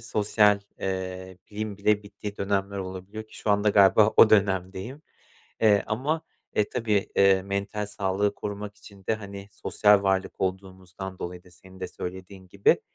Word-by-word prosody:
sosyal 105 Hz, -2 st, +3 dB, 0.2 s
eee, 95 Hz, -1 st, -4 dB
liğim 105 Hz, -1 st, -4 dB
bile 105 Hz, +1 st, +2 dB
bittiği 100 Hz, 0 st, -8 dB
dönemler 100 Hz, 0 st, -1 dB
olabiliyor 95 Hz, +3 st, -7 dB
ki -, -, -15 dB
şu 105 Hz, -, -2 dB
anda 105 Hz, +1 st, +3 dB
galiba 105 Hz, +2 st, +5 dB
o 110 Hz, -, +8 dB
dönemdeyim. 95 Hz, -, +1 dB, 0.6 s
Eee, 105 Hz, -2 st, +5 dB
ama, 140 Hz, +9 st, -1 dB, 0.3 s
e, 105 Hz, -, +1 dB
tabii, 110 Hz, -5 st, 0 dB
eee, 95 Hz, -1 st, +5 dB
mental 100 Hz, +2 st, -3 dB
sağlığı 100 Hz, -1 st, -1 dB
korumak 105 Hz, 0 st, -6 dB
için 100 Hz, -2 st, -16 dB
de, 110 Hz, -, +1 dB
hani, 100 Hz, -1 st, -9 dB
sosyal 105 Hz, -1 st, +3 dB
varlık 95 Hz, 0 st, 0 dB
olduğumuzdan 95 Hz, 0 st, -5 dB
dolayı 90 Hz, +1 st, -6 dB
da 90 Hz, -, -19 dB
senin 95 Hz, +1 st, -16 dB
de 90 Hz, -, -4 dB
söylediğin 95 Hz, +1 st, -8 dB
gibi, 100 Hz, +2 st, +2 dB
100 Hz, 155 wpm, -26 LUFS, 95-105 Hz, 0.6 s, o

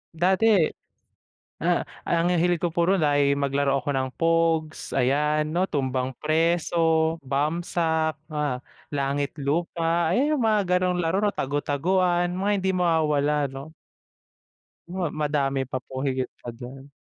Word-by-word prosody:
Dati, 185 Hz, +6 st, +2 dB, 1.2 s
ah, -, -, +1 dB, 0.2 s
ang 170 Hz, +1 st, +2 dB
hilig 175 Hz, 0 st, +2 dB
ko 170 Hz, 0 st, -2 dB
puro 175 Hz, +3 st, +2 dB
na 150 Hz, -4 st, +2 dB
ay 140 Hz, 0 st, +3 dB
maglaro 140 Hz, 0 st, +1 dB
ako 135 Hz, -, -4 dB
ng 130 Hz, -1 st, -1 dB
pogs, 165 Hz, -1 st, +1 dB
ayan, 150 Hz, +4 st, +1 dB
'no? 185 Hz, +2 st, +1 dB
Tumbang 130 Hz, -2 st, -2 dB
preso, 165 Hz, +2 st, +1 dB, 0.5 s
bamsak, 160 Hz, +3 st, -1 dB, 0.2 s
ah, 150 Hz, -4 st, -1 dB, 0.3 s
langit 140 Hz, 0 st, -2 dB
lupa, 165 Hz, +3 st, 0 dB
ayan, 270 Hz, -, +2 dB
yung 290 Hz, -, 0 dB
mga 215 Hz, -2 st, +3 dB, 0.2 s
gan'ong 180 Hz, -1 st, +1 dB
laro 170 Hz, +4 st, 0 dB
'no, 210 Hz, -, +3 dB
tagu-taguan, 175 Hz, +4 st, 0 dB
mga 195 Hz, +3 st, 0 dB
hindi 190 Hz, 0 st, -1 dB
mawawala, 150 Hz, -4 st, +1 dB
'no? 135 Hz, +2 st, -7 dB, 1.2 s
Ma 175 Hz, -3 st, -3 dB
madami 140 Hz, -3 st, -1 dB
pa 130 Hz, -1 st, -4 dB
po 130 Hz, +1 st, -7 dB
higit 130 Hz, -1 st, -2 dB
pa -, -, -13 dB
dun. 130 Hz, +3 st, -10 dB
155 Hz, 135 wpm, -25 LUFS, 140-175 Hz, 1.2 s, ay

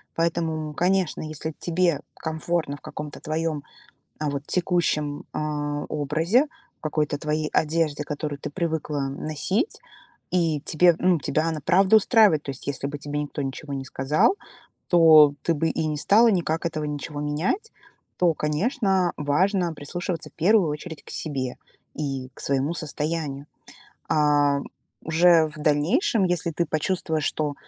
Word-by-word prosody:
Поэтому, 165 Hz, -2 st, -1 dB
м, 150 Hz, -, -8 dB
конечно, 180 Hz, 0 st, +1 dB
если 155 Hz, 0 st, -5 dB
тебе 170 Hz, -3 st, +1 dB
комфортно 160 Hz, -2 st, -2 dB
в -, -, -22 dB
каком-то 150 Hz, -1 st, -7 dB
твоем, 155 Hz, -1 st, -2 dB, 0.6 s
а, 150 Hz, -1 st, -1 dB
вот 140 Hz, 0 st, -3 dB
текущем, 160 Hz, -5 st, 0 dB
а, 145 Hz, -1 st, -2 dB
образе, 160 Hz, -, +2 dB, 0.3 s
в -, -, -48 dB
какой-то 150 Hz, -1 st, -1 dB
твоей 155 Hz, +1 st, -2 dB
одежде, 155 Hz, -2 st, +1 dB
которую 150 Hz, -1 st, -4 dB
ты -, -, -5 dB
привыкла 160 Hz, -3 st, -2 dB
носить, 155 Hz, -, -2 dB, 0.5 s
и 165 Hz, -5 st, +1 dB
тебе 170 Hz, +2 st, +4 dB
Ну, 180 Hz, -2 st, +3 dB
тебя 155 Hz, +3 st, 0 dB
она 160 Hz, -2 st, -2 dB
правда 190 Hz, +3 st, +5 dB
устраивает. 210 Hz, -, +4 dB
То 140 Hz, -, -4 dB
есть, 135 Hz, +1 st, -10 dB
если 140 Hz, 0 st, -2 dB
бы 145 Hz, 0 st, -5 dB
тебе 145 Hz, +1 st, -4 dB
никто 145 Hz, 0 st, -4 dB
ничего 140 Hz, +2 st, -5 dB
не 135 Hz, -, -3 dB
сказал, 150 Hz, -, +2 dB, 0.5 s
то 155 Hz, -4 st, +7 dB
ты 165 Hz, -, +1 dB
бы 160 Hz, +2 st, 0 dB
и 160 Hz, -, -1 dB
не 150 Hz, -, -1 dB
стала 220 Hz, +10 st, +5 dB
никак 170 Hz, -4 st, 0 dB
этого 155 Hz, -2 st, -3 dB
ничего 145 Hz, 0 st, -4 dB
менять, 160 Hz, -, -1 dB, 0.5 s
то, 175 Hz, -2 st, +3 dB
конечно, 190 Hz, -, +1 dB
важно 175 Hz, +4 st, +1 dB
прислушиваться, 170 Hz, +3 st, -4 dB
в -, -, -43 dB
первую 190 Hz, 0 st, +3 dB
очередь, 150 Hz, +1 st, -7 dB
к -, -, -12 dB
себе 135 Hz, -5 st, -3 dB, 0.4 s
и 135 Hz, -3 st, -4 dB
к -, -, -13 dB
своему 140 Hz, +4 st, 0 dB
состоянию. 150 Hz, -2 st, -3 dB, 0.6 s
А 145 Hz, -2 st, +3 dB, 0.4 s
уже 165 Hz, 0 st, +4 dB
в 155 Hz, -, -12 dB
дальнейшем, 175 Hz, -, +2 dB
если 175 Hz, -2 st, 0 dB
ты 170 Hz, +2 st, -1 dB
почувствуешь, 160 Hz, 0 st, -1 dB
что 150 Hz, -2 st, -1 dB
155 Hz, 150 wpm, -24 LUFS, 145-175 Hz, 0.6 s, то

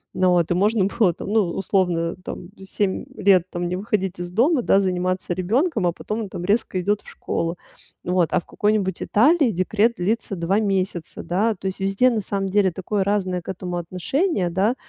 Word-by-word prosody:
Ну 185 Hz, 0 st, +3 dB
вот, 175 Hz, -2 st, +2 dB
и -, -, +2 dB
можно 205 Hz, +2 st, +2 dB
было 200 Hz, -2 st, +2 dB
там, -, -, -8 dB
ну, 220 Hz, 0 st, +4 dB
условно 180 Hz, -4 st, 0 dB
там 175 Hz, -, -7 dB
7 190 Hz, 0 st, -2 dB
лет 190 Hz, -3 st, +4 dB
там 175 Hz, 0 st, -2 dB
не 180 Hz, -, -2 dB
выходить 190 Hz, -2 st, -2 dB
из 175 Hz, 0 st, -5 dB
дома, 255 Hz, -, +3 dB
да, 195 Hz, -, +4 dB
заниматься 185 Hz, -1 st, -1 dB
ребёнком, 220 Hz, -, +1 dB
а -, -, +2 dB
потом 215 Hz, +6 st, -4 dB
он 210 Hz, -, -5 dB
там 175 Hz, -, -6 dB
резко 205 Hz, -1 st, +1 dB
идет 205 Hz, +3 st, 0 dB
в -, -, -14 dB
школу. 170 Hz, +1 st, -3 dB, 0.5 s
Вот, 180 Hz, -2 st, +2 dB
а -, -, +3 dB
в -, -, -14 dB
какой-нибудь 205 Hz, -3 st, 0 dB
Италии 280 Hz, +4 st, +4 dB
декрет 215 Hz, +5 st, +1 dB
длится 205 Hz, +3 st, -1 dB
2 175 Hz, +5 st, +1 dB
месяца, 190 Hz, -4 st, -2 dB
да, 210 Hz, +5 st, +1 dB
то 190 Hz, -, -14 dB
есть 190 Hz, -, -4 dB
везде 195 Hz, +6 st, +3 dB
на 230 Hz, -3 st, -1 dB
самом 195 Hz, 0 st, -2 dB
деле 195 Hz, -1 st, +3 dB
такое 190 Hz, +3 st, -2 dB
разное 190 Hz, -2 st, 0 dB
к -, -, -11 dB
этому 180 Hz, -1 st, -4 dB
отношение, 185 Hz, -, -1 dB
да, 195 Hz, +8 st, +1 dB
190 Hz, 200 wpm, -22 LUFS, 180-210 Hz, 0.5 s, ну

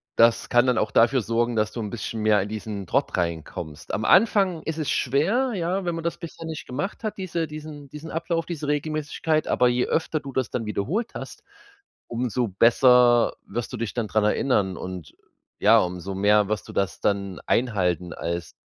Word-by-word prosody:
das 115 Hz, 0 st, +4 dB
kann 120 Hz, +1 st, +4 dB
dann 125 Hz, -2 st, +2 dB
auch -, -, -1 dB
dafür 120 Hz, +2 st, +4 dB
sorgen, 115 Hz, +2 st, 0 dB
dass 110 Hz, -1 st, +1 dB
du -, -, -6 dB
'n 105 Hz, -2 st, -3 dB
bisschen 110 Hz, 0 st, -5 dB
mehr 105 Hz, -2 st, +4 dB
in 100 Hz, -, -4 dB
diesen 105 Hz, -2 st, -5 dB
Trott -, -, 0 dB
reinkommst. 80 Hz, -2 st, -4 dB
Am 110 Hz, -, -1 dB
Anfang 195 Hz, -5 st, +4 dB
ist 160 Hz, -1 st, -4 dB
es 155 Hz, -3 st, -2 dB
schwer, 195 Hz, -, +1 dB
ja, 185 Hz, +2 st, -1 dB
wenn 170 Hz, -1 st, -1 dB
man 165 Hz, -, -5 dB
das 170 Hz, -, -2 dB
bisher 165 Hz, -1 st, -9 dB
nicht 160 Hz, -1 st, -6 dB
gemacht 170 Hz, -, -4 dB
hat, 215 Hz, -1 st, -3 dB
diese 170 Hz, -4 st, -2 dB
diesen 150 Hz, -2 st, -9 dB
diesen 150 Hz, +3 st, -9 dB
Ablauf, 165 Hz, +1 st, -2 dB
diese 155 Hz, -4 st, -5 dB
Regelmäßigkeit. 155 Hz, +1 st, -1 dB
Aber 125 Hz, -, +3 dB
je 125 Hz, 0 st, +2 dB
öfter 160 Hz, -1 st, 0 dB
du 140 Hz, -2 st, -8 dB
das 130 Hz, -3 st, -1 dB
dann 115 Hz, -, -2 dB
wiederholt 150 Hz, -, -2 dB
hast, -, -, -8 dB, 0.6 s
umso 120 Hz, 0 st, -1 dB
besser 120 Hz, +3 st, +5 dB
wirst 120 Hz, +1 st, -5 dB
du -, -, -3 dB
dich 115 Hz, -2 st, -3 dB
dann 115 Hz, -3 st, -1 dB
dran 110 Hz, +1 st, +1 dB
erinnern. 105 Hz, -5 st, +1 dB
Und 90 Hz, -4 st, -7 dB, 0.5 s
ja, 115 Hz, +2 st, +6 dB
umso 90 Hz, 0 st, -3 dB
mehr 105 Hz, +1 st, +4 dB
wirst 110 Hz, -, -2 dB
du -, -, -8 dB
das 100 Hz, -1 st, -1 dB
dann 100 Hz, -2 st, -1 dB
einhalten 90 Hz, -7 st, 0 dB
als 85 Hz, 0 st, -4 dB
120 Hz, 195 wpm, -24 LUFS, 105-155 Hz, 0.6 s, ja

